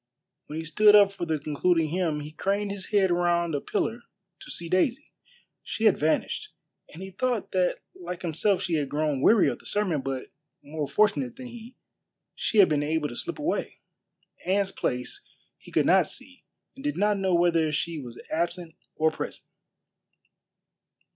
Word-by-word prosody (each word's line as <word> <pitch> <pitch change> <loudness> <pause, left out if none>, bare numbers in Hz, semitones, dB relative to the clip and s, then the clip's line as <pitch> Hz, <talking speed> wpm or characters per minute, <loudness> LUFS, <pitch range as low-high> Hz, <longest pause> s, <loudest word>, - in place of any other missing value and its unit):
When 150 - -6
he 160 - -4
stood 210 +6 +6
up 200 -1 +7
for 175 -3 -5
the 160 -1 0
concluding 155 +2 +1
hymn 165 -3 -1
he 150 +1 -8
craned 200 +5 -1
his 200 -2 -6
head 195 -3 +3
round 175 -1 +1
a 145 - -1
pillar 225 +3 -2 0.4
to - - -12
see 170 - -4
Daisy. 185 +9 0 0.5
She 225 - -5
had 215 -4 +5
vanished, 155 +2 0 0.4
and 170 +5 -9
he 190 - -8
thought 240 +2 -1
that 185 -1 +1
like 180 0 -7
himself 180 +4 +1
she 175 - -2
had 145 -2 -2
grown 150 -2 0
weary 215 +6 +5
of - - -2
the - - -10
sermon, 185 -8 0
but 135 -1 -5 0.3
more 150 0 -4
fortunate 215 - +1
than 260 -1 -9
he, 240 +1 -11 0.6
she 220 - -2
had 200 - +8
been 150 -2 +1
able 150 0 -1
to - - -8
slip 345 - -3
away. 305 +3 -2 0.7
Anne's 195 +1 +1
place 125 -7 -3 0.4
he - - -15
could - - +2
not - - +5
see - - -9 0.3
and 270 - -11
did 295 0 -2
not 205 0 +2
know 190 -2 +2
whether 170 -2 +3
she 160 +2 -2
was 120 -4 -9
absent 170 0 -2 0.2
or 160 0 +2
present. - - -6
175 Hz, 175 wpm, -27 LUFS, 155-205 Hz, 0.7 s, had